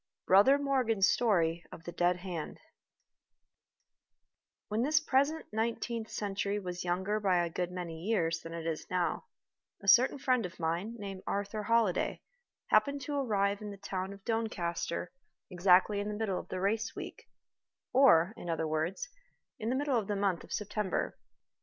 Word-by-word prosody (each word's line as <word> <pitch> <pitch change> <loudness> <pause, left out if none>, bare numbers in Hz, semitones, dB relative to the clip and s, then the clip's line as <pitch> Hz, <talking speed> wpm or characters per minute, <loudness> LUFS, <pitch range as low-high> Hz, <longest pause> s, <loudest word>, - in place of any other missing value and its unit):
BROTHER 205 +9 +6
MORGAN'S 255 -8 +2
STORY 170 -7 +2
of 165 - -10
THE 175 - -6
DEAD 175 +1 +2
HAND 180 -3 -6 2.1
WHEN 215 +2 -1
this 305 +4 +3
present 305 +2 +1
nineteenth 230 0 -2
century 205 0 -2
was 180 -3 -5
younger 190 +4 0
by 185 -4 +2
a 170 - -5
good 180 +1 -2
many 170 -3 -6
years 170 -6 0
than 165 - -9
it 165 -1 -6
is 165 -1 -3
now, 180 - -1 0.5
a 200 - -12
certain 245 +8 +6
friend 255 -3 +1
of 180 -1 -7
mine, 170 +8 -2
named 195 -3 -6
Arthur 205 +2 -2
Holliday, 220 -3 +1 0.5
happened 280 0 +3
to 295 - -4
arrive 205 -7 0
in 210 - -5
the 200 - -8
town 190 -1 -4
of 200 -1 -12
Doncaster 175 -7 -2 0.4
exactly 185 +3 +4
in 205 - -2
the 210 - -3
middle 205 -4 -1
of - - -10
the 185 - -4
race 220 +4 -1
week, - - -8 0.6
or, 220 -9 +6
in 175 - -8
other 160 -1 -1
words, 160 - -2 0.5
in 220 0 -2
the 255 - +1
middle 275 -3 +1
of 205 - -5
the 205 - -1
month 195 -3 0
of - - -15
September. 210 -1 -2
200 Hz, 165 wpm, -31 LUFS, 180-225 Hz, 2.1 s, BROTHER